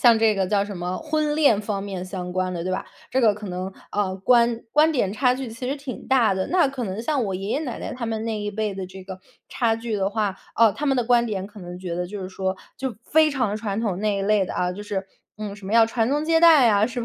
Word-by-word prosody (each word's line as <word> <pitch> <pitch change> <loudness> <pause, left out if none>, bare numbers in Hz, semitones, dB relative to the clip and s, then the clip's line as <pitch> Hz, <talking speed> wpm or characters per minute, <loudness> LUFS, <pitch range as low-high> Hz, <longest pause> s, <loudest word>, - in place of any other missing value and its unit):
像 235 -2 +6
这 220 -1 +4
个 195 - +1
叫 205 -1 +2
什 200 -2 -7
么 180 +1 -3
婚 305 -1 -1
恋 240 -9 +4
方 205 -1 -2
面 190 -2 -5
相 180 -1 -5
关 185 0 -1
的 170 -1 -4
对 185 - -1
吧， 185 - -2 0.3
这 260 - +3
个 220 -3 +5
可 210 0 -8
能， 185 +1 -4 0.2
呃， 195 -2 0
观 235 +3 +3
观 310 +2 +5
点 205 -10 0
差 250 +2 +3
距 265 -1 -5
其 230 +3 -6
实 285 - -1
挺 275 -2 -8
大 245 -7 +4
的。 190 0 -2
那 360 -4 +4
可 270 -2 -4
能 195 0 -3
像 265 +1 0
我 195 - -2
爷 195 +2 -5
爷 285 - 0
奶 255 -7 -4
奶 - - -5
他 245 -2 -5
们 225 -1 -2
那 220 -2 -2
一 205 - -2
辈 210 -1 -2
的 190 -1 -4
这 185 0 -11
个 190 -1 -8 0.3
差 225 -2 +1
距 230 -1 -4
的 195 -1 0
话， 205 -3 -1 0.2
啊， 225 -2 +5
他 295 - -5
们 270 -2 +2
的 245 - +1
观 240 0 +4
点 200 -4 -3
可 210 0 -13
能 175 0 -8
觉 180 -2 -4
得 180 +1 -2
就 205 +1 -6
是 185 - -5
说， 190 0 -2 0.2
就 265 -2 -3
非 315 0 +4
常 245 -7 0
传 210 -1 -3
统 200 -5 -1
那 210 -1 +1
一 - - -2
类 205 0 +3
的 - - -6
啊， 180 0 -1
就 205 +3 -7
是， 195 -2 -4 0.3
嗯， 210 -2 -5
什 200 - -13
么 195 - -4
要 230 0 +6
传 225 0 0
宗 295 +3 0
接 325 0 +3
代 310 -8 +7
啊， 205 0 +4
是 245 +1 -3
吧？ 230 - -3
215 Hz, 305 characters per minute, -24 LUFS, 195-245 Hz, 0.3 s, 代